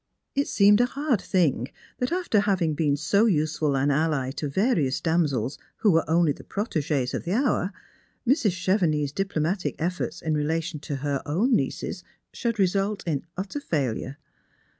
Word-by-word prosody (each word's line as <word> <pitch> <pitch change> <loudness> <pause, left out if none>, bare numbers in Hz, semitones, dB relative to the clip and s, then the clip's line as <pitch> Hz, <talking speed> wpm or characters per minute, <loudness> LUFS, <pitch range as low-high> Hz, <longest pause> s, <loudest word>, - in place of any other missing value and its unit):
It 280 +1 0
seemed 205 +2 +5
a 245 - +3
hard 275 -5 0
thing 150 - +1 0.3
that, 250 - -1
after 350 - +1
having 190 -6 +1
been 145 -1 +1
so 200 +9 +3
useful 155 -5 +1
an 140 +2 +2
ally 145 -3 +1
to 145 +1 -4
various 160 - +1
damsels 150 -7 0 0.2
who 210 - +3
were 165 -1 +2
only 165 -1 +4
the - - -7
protegees 150 - -1
of - - -3
the 175 - -2
hour, 230 -6 +1 0.6
]\Irs. 265 -4 +3
Chevenix's 175 -6 +1
diplomatic 185 +1 -1
efforts 170 0 -3
ic 160 - 0
relation 155 +1 -1
to 145 0 -5
her 140 -2 0
own 215 - +2
nieces - - -2 0.3
should 230 -2 -2
result 195 +1 +1
iu 150 -5 -1 0.2
utter 195 +9 -3
failure. 140 - -2
165 Hz, 160 wpm, -25 LUFS, 150-205 Hz, 0.6 s, seemed